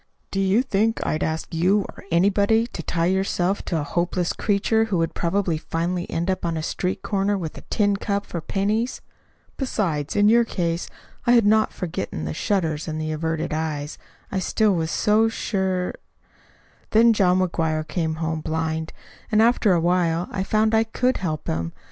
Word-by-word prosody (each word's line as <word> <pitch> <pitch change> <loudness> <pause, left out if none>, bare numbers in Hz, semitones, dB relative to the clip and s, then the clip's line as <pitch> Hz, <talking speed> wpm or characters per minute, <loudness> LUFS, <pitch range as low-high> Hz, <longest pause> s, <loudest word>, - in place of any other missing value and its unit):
"Do 195 - -1
you 195 +5 +3
think 225 -2 +1
I'd 155 - -1
ask 160 +2 -2
you 185 +5 +3
or - - -12
anybody 200 +6 +3
to 235 - -7
tie 165 +1 -1
yourself 190 +1 0
to 165 - -1
a - - -2
helpless 175 +3 -1
creature 220 +2 +1
who 205 -5 -1
would 165 -1 0
probably 170 -2 0
finally 175 +2 -2
end 170 +2 -2
up 185 -1 -1
on 165 -1 -1
a 155 - -3
street 180 +3 -2
corner 200 0 0
with 165 -5 -5
a - - -9
tin 205 -2 +2
cup 200 0 -2
for 170 - -5
pennies? 210 +8 -1 0.6
Besides, 170 - -1
in 205 0 +4
your 235 +2 +6
case, 170 -6 -2 0.4
I 240 - +6
had 235 -3 +5
not 215 +1 +4
forgotten 100 - -4
the 75 - -3
shudders 160 - -1
and 155 -1 -3
the 155 0 -2
averted 160 +1 -2
eyes. 155 -2 -3 0.3
I 195 - 0
still 210 +2 +2
was 165 -2 -1
so 215 +5 +3
sure 190 -4 -1 1.0
"Then 230 +1 +5
John 185 -4 +3
McGuire 160 -4 0
came 160 0 -1
home 160 0 -2
blind; 160 0 -2 0.4
and 215 - +4
after 225 -3 +4
a 175 - +3
while 175 0 +1
I 190 - -2
found 215 +2 +1
I 220 0 +5
could 250 +3 0
help 155 -5 -3
him. 80 +1 -2
180 Hz, 180 wpm, -23 LUFS, 160-205 Hz, 1.0 s, your